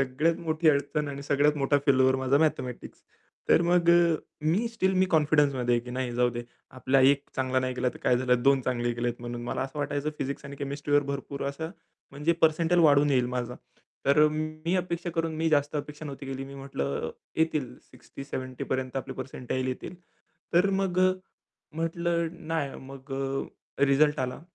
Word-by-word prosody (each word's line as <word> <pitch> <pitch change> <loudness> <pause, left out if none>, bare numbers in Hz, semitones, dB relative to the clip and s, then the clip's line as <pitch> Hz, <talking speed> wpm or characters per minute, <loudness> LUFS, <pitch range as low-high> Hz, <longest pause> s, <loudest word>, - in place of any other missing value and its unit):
सगळ्यात 135 +5 +1
मोठी 160 0 +1
अडचण 145 0 +1
आणि 140 0 -6
सगळ्यात 145 +1 +2
मोठा 145 +1 +2
फेल्युअर 130 -1 +4
माझा 130 +1 +2
मॅथेमॅटिक्स. 145 -5 -1 0.5
तर - - +5
मग 170 0 +2
अ, 170 -1 +5 0.3
मी 165 +10 +1
स्टिल 190 -5 0
मी 185 0 +3
कॉन्फिडन्समध्ये 145 -6 +3
आहे 120 - +1
की 125 - -8
नाही 125 -1 -3
जाऊ 125 0 +3
दे. 120 0 -5 0.3
आपला 130 +1 +1
1 135 +1 +5
चांगला 130 0 +1
नाही 130 0 -2
गेला 125 0 0
तर - - -11
काय 125 - +3
झालं, 125 -1 +1
2 135 0 +4
चांगले 120 -1 -1
केलेत 120 0 -1
म्हणून 120 0 -5
मला 120 - -2
असं 135 +3 -6
वाटायचं 145 +1 -1
फिजिक्स 140 +1 -4
आणि 140 0 -8
केमिस्ट्रीवर 145 +1 0
भरपूर 140 0 -5
असं 160 +4 -5 0.4
म्हणजे 150 +4 0
पर्सेंटाइल 165 +2 +4
वाढून 145 -1 +5
येईल 125 -3 +3
माझा. 125 -1 -3 0.5
तर 150 +2 +6
मी 155 +2 -3
अपेक्षा 175 -1 -2
करून, 165 -1 -2
मी 160 +1 +1
जास्त 145 -1 +1
अपेक्षा 150 +1 -6
नव्हती 140 -1 -7
केली. 135 0 -4
मी 135 +1 -10
म्हटलं 135 - -3 0.3
येतील 155 -6 0 0.2
60-70 130 -2 -7
पर्यंत 130 0 -2
आपले 135 0 -4
पर्सेंटाईल 130 0 -4
येतील. 130 +7 -5 0.6
तर 180 +3 +4
मग 185 -2 0
अ, 185 0 +5 0.6
म्हटलं 170 0 -2
नाही 155 -4 -2 0.2
मग 135 +1 -12
अ, 135 +1 -3
रिझल्ट 150 +2 +3
आला. 130 +2 -3
140 Hz, 175 wpm, -28 LUFS, 130-160 Hz, 0.6 s, तर